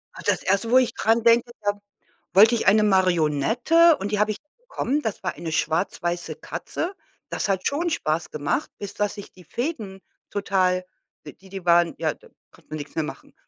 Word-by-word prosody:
Ah, - - -9
das - - +1
erste, 200 +4 +1
wo 255 - +7
ich 245 -2 +3
dran 225 +1 +2
denke, 235 +1 +4
da 205 - +3 0.6
wollte 220 +5 +7
ich - - -2
eine 210 +2 +6
Marionette 195 - +3
und 200 +1 -4
die 210 - 0
habe 210 +1 +2
ich - - -8 0.2
bekommen, 300 - -2
das 220 -8 -4
war 185 - -2
eine 165 -2 -6
schwarz-weiße 175 +2 -1
Katze. 370 +3 -5 0.3
Das - - -2
hat 190 -1 0
schon 330 +4 0
Spaß 160 - -1
gemacht, 150 - -1
bis 200 - -7
dass 205 -1 -1
sich 205 -2 -10
die 180 -1 -17
Fäden 220 - -4 0.3
total 185 -2 +1 0.4
die 190 - -13
die 190 -2 -8
waren 170 -1 +4
ja, - - 0
da - - -20 0.2
konnte - - -22
man 155 - -4
nix 145 0 -8
mehr 160 - +1
machen. - - -9
200 Hz, 190 wpm, -24 LUFS, 175-235 Hz, 0.6 s, wo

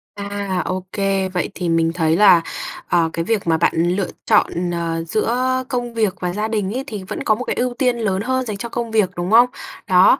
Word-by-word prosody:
À, 200 -2 -3
ô 185 0 -3
kê, 195 -1 0
vậy 180 -1 -2
thì 175 -2 -2
mình 165 0 +2
thấy 160 -2 +2
là, 180 -3 +7 0.5
ờ, 165 -2 +2
cái 165 - -2
việc 215 -3 -1
mà 165 -1 +3
bạn - - +2 0.2
lựa 195 -1 -1 0.2
chọn, 175 +1 +2
ờ, 165 -1 -2
giữa 255 +6 0
công 245 -2 -2
việc 215 -4 +1
và 180 -1 -2
gia 210 +3 -1
đình 210 -2 -1
ấy 260 - -2
thì 210 -3 -6
vẫn 185 - -5
có 215 - +3
một 250 - -5
cái - - -2
ưu 250 0 -1
tiên 250 -1 +1
lớn 195 -4 -1
hơn 260 +3 -1
dành 210 -4 -4
cho 235 +4 -5
công 235 -1 -4
việc, 215 -4 +3
đúng 175 +3 -3
không? 240 +2 +7 0.4
Đó, 185 -1 +6
200 Hz, 230 wpm, -20 LUFS, 180-230 Hz, 0.5 s, là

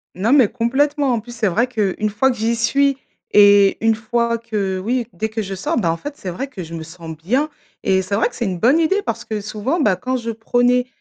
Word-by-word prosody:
Non 205 +6 0
mais 265 -6 +6
complètement. 270 +4 +1
En 235 - 0
plus, 240 +2 -11
c'est 225 -2 0
vrai 225 +7 +1
qu'une 215 -3 -1
fois 225 +6 +2
que 245 - -6
j'y 225 +2 0
suis 275 +4 +2 0.3
et 205 -1 +6
une 225 0 +4
fois 235 +1 -1
que, 210 -5 -3
oui, 235 +4 -1
dès 220 +6 -3
que 220 0 -3
je 195 -2 -5
sors, 195 +4 -2
ben 185 -8 +1
en 165 - -3
fait, 290 - -7
c'est 190 - -6
vrai 180 +11 -4
que 220 -10 -8
je 165 0 -10
me 165 -1 -5
sens 165 0 -9
bien 250 - 0 0.3
et 190 -4 +2
c'est 190 +2 -2
vrai 220 - +2
que 245 - -16
c'est 235 - -2
une 185 -3 -2
bonne 260 - +4
idée, 390 +6 +2
parce - - -3
que 215 -1 -3
souvent, 215 - -2
bah, 210 -9 +3
quand 255 +7 -2
je 230 -2 -4
prenais, 245 +2 +1
225 Hz, 250 wpm, -19 LUFS, 195-250 Hz, 0.3 s, mais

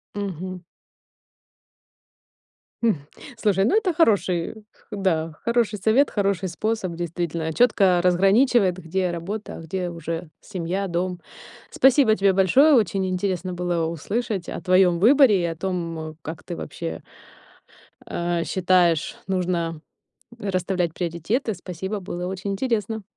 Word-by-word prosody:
Мгм. 185 -2 -5 2.2
М. 225 -4 +4 0.4
Слушай, 200 -3 +2
ну 310 - +2
это 385 -5 +1
хороший, 200 - +2 0.4
да, 170 -6 -1
хороший 235 -3 +1
совет, 225 +8 +3
хороший 195 -3 0
способ 205 +1 -2
действительно, 170 -1 -3
чётко 195 -5 +4
разграничивает, 195 +2 +3
где 185 +1 -2
работа, 195 +6 -5
а - - -9
где 180 +2 -3
уже 165 0 -5
семья, 190 +1 -3
дом. 180 +1 -2 0.5
Спасибо 260 -4 +5
тебе 195 -2 +3
большое, 195 - +5
очень 195 -5 +2
интересно 185 -1 -2
было 175 -2 -1
услышать 195 +3 -3
о - - -5
твоём 185 -2 +4
выборе 235 -3 +6
и - - +1
о 165 -1 -2
том, 165 -3 -4
как 160 +2 -7
ты 175 - -6
вообще, 165 +1 -6 1.0
а, 170 -1 -2
считаешь 175 -3 +2
нужно 175 -4 -1 0.6
расставлять 185 -4 -1
приоритеты. 180 - -2
Спасибо, 190 +3 -5
было 180 -1 -5
очень 190 +2 -4
интересно! 220 -1 -1
185 Hz, 120 wpm, -23 LUFS, 170-205 Hz, 2.2 s, выборе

